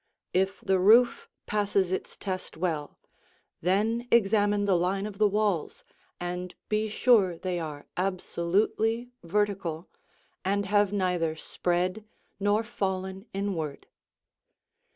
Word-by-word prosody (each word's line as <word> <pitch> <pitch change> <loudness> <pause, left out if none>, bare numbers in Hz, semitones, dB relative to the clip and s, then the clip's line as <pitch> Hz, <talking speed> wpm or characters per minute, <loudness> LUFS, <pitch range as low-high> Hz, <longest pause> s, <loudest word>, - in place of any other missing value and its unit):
If 190 +2 +1
the 190 -1 +2
roof 230 +6 +5 0.2
passes 200 -3 +1
its 190 - -3
test 185 -4 -5
well, 160 -4 -2 0.6
then 220 +7 +1
examine 205 -2 +3
the 195 -2 +3
line 185 +3 0
of 210 -1 -7
the 215 - +6
walls 205 -5 -1 0.4
and 180 0 -4
be 215 0 +1
sure 205 -6 +4
they 180 0 -2
are 150 -3 -6
absolutely 195 +6 0
vertical 180 -3 -1 0.5
and 200 +2 0
have 205 0 +3
neither 180 -5 0
spread 180 +5 -1 0.4
nor 205 +2 +2
fallen 190 -3 -3
inward. 185 -7 -3
195 Hz, 110 wpm, -28 LUFS, 180-210 Hz, 0.6 s, the